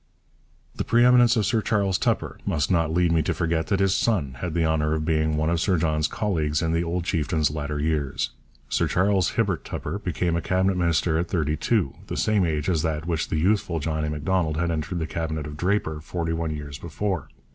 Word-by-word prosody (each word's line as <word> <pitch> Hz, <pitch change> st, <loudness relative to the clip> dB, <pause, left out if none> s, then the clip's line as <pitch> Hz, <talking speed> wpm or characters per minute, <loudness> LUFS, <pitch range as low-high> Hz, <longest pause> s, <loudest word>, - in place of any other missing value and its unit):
The -, -, -2 dB
pre 120 Hz, +1 st, +4 dB
eminence 125 Hz, -1 st, +6 dB
of 110 Hz, -3 st, +1 dB
Sir 115 Hz, -3 st, +1 dB
Charles 100 Hz, -3 st, +1 dB
Tupper -, -, -1 dB
must 75 Hz, +4 st, 0 dB
not 80 Hz, -3 st, +2 dB
lead 85 Hz, 0 st, +2 dB
me 80 Hz, -1 st, +3 dB
to -, -, -1 dB
forget 80 Hz, -2 st, 0 dB
that 100 Hz, +4 st, +1 dB
his 95 Hz, -1 st, +3 dB
son 75 Hz, -, 0 dB
had 85 Hz, -3 st, -4 dB
the 85 Hz, -1 st, +2 dB
honour 80 Hz, -1 st, +1 dB
of 80 Hz, 0 st, -2 dB
being 80 Hz, -1 st, +1 dB
one 80 Hz, +2 st, +1 dB
of 85 Hz, -1 st, 0 dB
Sir 95 Hz, 0 st, +2 dB
John's 75 Hz, -1 st, +1 dB
colleagues 80 Hz, -7 st, -1 dB
in 80 Hz, 0 st, 0 dB
the 85 Hz, +1 st, +1 dB
old 85 Hz, +1 st, -2 dB
chieftain's 80 Hz, -3 st, 0 dB
latter 75 Hz, -1 st, -3 dB
years. 75 Hz, -3 st, -1 dB, 0.4 s
Sir -, -, +1 dB
Charles 95 Hz, -1 st, +2 dB
Hibbert 100 Hz, -7 st, 0 dB
Tupper 85 Hz, +7 st, -4 dB
became 90 Hz, -3 st, -1 dB
a 85 Hz, -, 0 dB
Cabinet 95 Hz, +2 st, +1 dB
minister 85 Hz, -2 st, +1 dB
at 85 Hz, -, -1 dB
thirty 75 Hz, -4 st, 0 dB
two, 100 Hz, -, 0 dB
the -, -, -4 dB
same 105 Hz, -5 st, +2 dB
age 75 Hz, -2 st, -1 dB
as 85 Hz, -4 st, +1 dB
that 80 Hz, -2 st, 0 dB
at -, -, -11 dB
which 85 Hz, -2 st, -1 dB
the 80 Hz, -, -1 dB
youthful 90 Hz, -1 st, +1 dB
John 80 Hz, +1 st, -2 dB
A. 75 Hz, -, -1 dB
Macdonald 80 Hz, +1 st, 0 dB
had 85 Hz, +1 st, 0 dB
entered 80 Hz, +2 st, -3 dB
the 80 Hz, -, -1 dB
Cabinet 80 Hz, -1 st, -3 dB
of 75 Hz, 0 st, -7 dB
Draper, 80 Hz, -2 st, -1 dB
forty 85 Hz, +1 st, -3 dB
one 80 Hz, 0 st, -2 dB
years 75 Hz, -2 st, -6 dB
before. 85 Hz, -1 st, -3 dB
80 Hz, 220 wpm, -25 LUFS, 75-95 Hz, 0.4 s, eminence